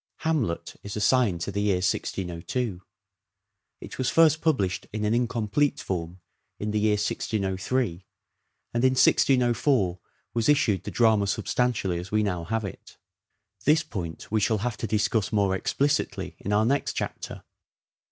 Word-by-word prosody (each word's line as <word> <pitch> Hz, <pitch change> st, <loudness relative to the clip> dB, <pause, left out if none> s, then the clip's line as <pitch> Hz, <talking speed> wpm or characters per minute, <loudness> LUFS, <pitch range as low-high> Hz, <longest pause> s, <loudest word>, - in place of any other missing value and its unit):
" -, -, -58 dB
Hamlet 135 Hz, -, -1 dB
" -, -, -43 dB
is 100 Hz, -, -6 dB
assigned 105 Hz, -6 st, +2 dB
to 100 Hz, -, -3 dB
the 100 Hz, -, -2 dB
year 105 Hz, -2 st, +2 dB
1602. 90 Hz, +3 st, -2 dB, 1.0 s
It -, -, -10 dB
was 130 Hz, -, +1 dB
first 160 Hz, -1 st, +4 dB
published 100 Hz, -, 0 dB
in 105 Hz, 0 st, -2 dB
an 105 Hz, -, +1 dB
incomplete 120 Hz, +3 st, +1 dB
form 90 Hz, -1 st, -4 dB, 0.4 s
in 105 Hz, +1 st, -3 dB
the 105 Hz, -, +1 dB
year 105 Hz, 0 st, +3 dB
1603, 100 Hz, -1 st, -1 dB, 0.7 s
and 120 Hz, +1 st, 0 dB
in 130 Hz, 0 st, +5 dB
1604 125 Hz, -7 st, +3 dB, 0.3 s
was 115 Hz, +1 st, +1 dB
issued 125 Hz, -10 st, +2 dB
the -, -, -3 dB
drama 110 Hz, -4 st, +3 dB
substantially 100 Hz, -4 st, 0 dB
as 90 Hz, +2 st, -8 dB
we 110 Hz, 0 st, +2 dB
now 90 Hz, -5 st, -2 dB
have 110 Hz, +3 st, -1 dB
it. 95 Hz, -, -10 dB, 0.7 s
This 155 Hz, +2 st, +4 dB
point 90 Hz, -, -6 dB
we 110 Hz, -, +2 dB
shall 110 Hz, +2 st, +2 dB
have 120 Hz, -3 st, -1 dB
to 115 Hz, -, -3 dB
discuss 105 Hz, 0 st, +1 dB
more 100 Hz, -3 st, +2 dB
explicitly 140 Hz, +9 st, -1 dB
in 100 Hz, -, -4 dB
our 105 Hz, +1 st, +3 dB
next 140 Hz, +4 st, +1 dB
chapter. -, -, -5 dB
105 Hz, 155 wpm, -26 LUFS, 95-125 Hz, 1.0 s, in